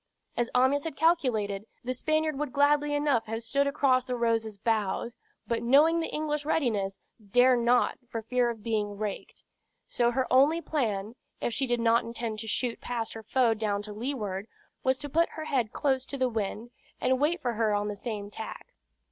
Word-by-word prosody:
As 240 0 0
Amyas 260 +3 +3
had 325 -3 -4
calculated, 230 - +1 0.2
the 255 +1 -2
Spaniard 310 +2 0
would 295 -3 -2
gladly 290 +1 +3
enough 290 -7 +1
have 225 +1 -3
stood 280 +5 +1
across 275 -3 +3
the 250 -1 -3
Rose's 225 -3 0
bows, 220 +1 -1 0.3
but 230 -1 -1
knowing 295 +8 +5
the 325 - -2
English 300 -1 -2
readiness, 215 -11 0 0.3
dare 245 +5 +5
not 240 +1 +2
for 225 -2 -4
fear 245 +1 +1
of 225 -3 -6
being 210 -3 -1
raked; 210 -1 -5 0.4
so 240 -1 +2
her 255 +2 0
only 285 +6 +5
plan, 220 -10 -2 0.3
if 240 - -2
she 270 +3 0
did 240 -1 +1
not 230 +1 +3
intend 230 -1 -4
to 220 - -6
shoot 235 +2 -1
past 235 -2 -3
her 225 - -7
foe 235 +1 +2
down 210 -2 -1
to 210 0 -7
leeward, 210 -4 -3 0.4
was 260 0 +2
to 290 - -6
put 330 +4 +2
her 315 - -6
head 245 -7 0
close 265 -2 0
to 280 - -4
the 260 -1 +1
wind, 220 +1 -3 0.3
and 260 0 +2
wait 330 +4 +2
for 245 -2 -1
her 220 -1 +1
on 205 0 -1
the 210 - -3
same 205 -1 -5
tack. 220 +1 -8
240 Hz, 190 wpm, -28 LUFS, 220-280 Hz, 0.4 s, knowing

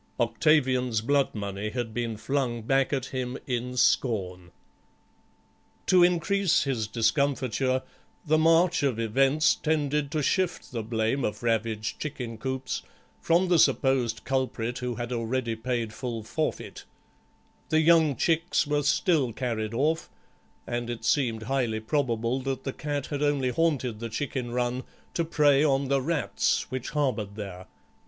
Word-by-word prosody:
Octavian's 125 -1 +2
bloodmoney 105 -6 -1
had 120 -3 -3
been 115 -2 -2
flung 120 0 -1
back 135 +3 +2
at 135 -3 -1
him 130 -1 -4
in 125 0 -3
scorn. 90 -9 +1 1.4
To 185 -1 +5
increase 180 0 +3
his 125 -7 -1
discomfiture 130 +1 +1 0.4
the 155 0 +3
march 165 +2 +4
of 135 -5 +1
events 135 +7 +3
tended 150 -2 0
to 150 0 -1
shift 180 +3 0
the 120 -2 -3
blame 110 +4 -1
of 105 - -3
ravaged 115 -1 -1
chicken 120 -7 -5
coops 130 +1 -3 0.4
from 170 +3 +3
the 175 -2 +4
supposed 125 -7 +2
culprit 125 -3 -2
who 125 -1 -3
had 120 +1 -5
already 115 0 -1
paid 115 -1 -2
full 115 -2 -5
forfeit; 155 +8 -3 0.9
the 155 0 +3
young 160 -3 +5
chicks 165 +6 +1
were 145 0 +1
still 150 -2 +2
carried 115 -2 -3
off, 155 +6 0 0.6
and 120 0 -3
it 120 -1 -5
seemed 115 -6 +1
highly 120 -3 -1
probable 115 0 0
that 135 0 -3
the 135 - -3
cat 145 -2 -3
had 145 -1 -4
only 145 -3 +1
haunted 130 -6 0
the 115 0 -5
chicken 130 +1 -3
run 125 +1 -1 0.3
to 170 - 0
prey 150 -3 +3
on 135 -2 +1
the 140 -1 +2
rats 160 0 0
which 130 -1 -4
harboured 115 -9 -1
there. 95 -3 -7
130 Hz, 140 wpm, -27 LUFS, 115-145 Hz, 1.4 s, To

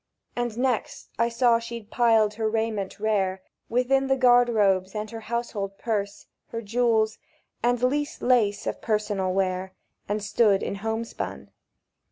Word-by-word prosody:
And 240 -2 -2
next 250 -2 -1
I 235 0 +3
saw 235 0 +3
she'd 230 -2 -8
piled 225 -3 +3
her 220 0 -1
raiment 220 -3 -2
rare 195 -3 0 0.3
Within 265 +3 +2
the 270 - +3
garde 245 -1 +5
robes, 195 -3 +2
and 210 0 -3
her 225 - -6
household 215 -4 -4
purse, 205 -3 -3 0.2
Her 230 0 -5
jewels, 220 0 +1 0.4
and 245 +1 +1
least 290 +4 0
lace 215 -5 +2
of - - -3
personal 210 -4 0
wear; 185 0 -1 0.4
And 210 0 -1
stood 205 -1 +3
in 200 - -3
homespun. 225 +2 -4
220 Hz, 145 wpm, -26 LUFS, 205-240 Hz, 0.4 s, garde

